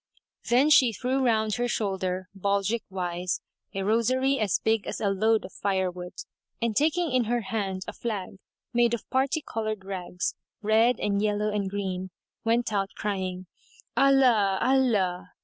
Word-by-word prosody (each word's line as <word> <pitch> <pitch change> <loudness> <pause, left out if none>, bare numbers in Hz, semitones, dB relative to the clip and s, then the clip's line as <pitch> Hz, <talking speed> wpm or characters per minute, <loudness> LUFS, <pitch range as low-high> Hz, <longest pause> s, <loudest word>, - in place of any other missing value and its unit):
Then 260 +6 +4
she 255 -6 +6
threw 260 +5 0
round 220 -3 +2
her 245 0 0
shoulder, 190 -5 -2
baldrick 200 +3 0
wise, 180 -1 -2 0.4
a 195 - -1
rosary 255 +6 +2
as 210 -4 +2
big 220 -1 0
as - - -4
a 205 - +1
load 220 +3 +2
of - - -11
firewood, 185 -2 -2 0.5
and 230 -2 -1
taking 320 +3 +2
in 255 -2 +2
her 240 +2 0
hand 195 -3 -3
a - - -5
flag, 200 -4 -5 0.3
made 235 0 +3
of 235 - -11
parti 275 +4 +1
coloured 215 -3 -3
rags, 180 -2 -3 0.3
red 220 +3 +3
and 200 -1 0
yellow 210 0 0
and 200 -2 -1
green, 190 -2 -3 0.3
went 230 0 +1
out, 195 -1 0
crying, 185 -3 -3 0.5
"Allah! 250 -8 +4
Allah!" 230 -9 +1
215 Hz, 150 wpm, -27 LUFS, 190-240 Hz, 0.5 s, she